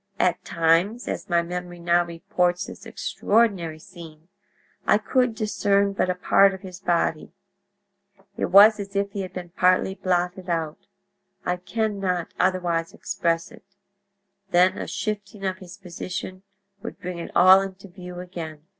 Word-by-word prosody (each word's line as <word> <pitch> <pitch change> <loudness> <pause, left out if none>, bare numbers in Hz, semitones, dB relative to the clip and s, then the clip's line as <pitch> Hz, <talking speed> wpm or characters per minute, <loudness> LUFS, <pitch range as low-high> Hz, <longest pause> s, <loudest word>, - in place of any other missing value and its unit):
At - - +1
times, 170 +8 +1
as - - -4
my 170 -1 +2
memory 175 0 -6
now 170 0 +3
reports 175 +1 -1
this - - -11
extraordinary 200 -8 0
scene, 165 -2 -13 0.6
I - - +5
could 250 +2 +1
discern 200 -2 +1
but 185 - 0
a 180 - 0
part 195 +2 +4
of 190 - -12
his 185 -2 -9
body; 170 -4 -1 1.0
it - - -1
was 210 +3 +7
as 200 0 -7
if 200 0 0
he 200 - -4
had 185 - -6
been 180 -1 -7
partly 185 +2 +2
blotted 180 -1 -1
out—I 185 +3 -5
can 210 +3 -2
not 180 -3 -2
otherwise 175 -3 0
express 165 +2 -1
it—then 200 -3 -3
a - - -4
shifting 210 -1 -4
of 185 -1 -2
his 185 0 -11
position 185 0 -6 0.4
would - - -8
bring 180 -1 -6
it 170 - -6
all 185 +2 +8
into 195 0 -7
view 180 -1 -9
again. 165 -4 -8
185 Hz, 145 wpm, -24 LUFS, 175-200 Hz, 1.0 s, all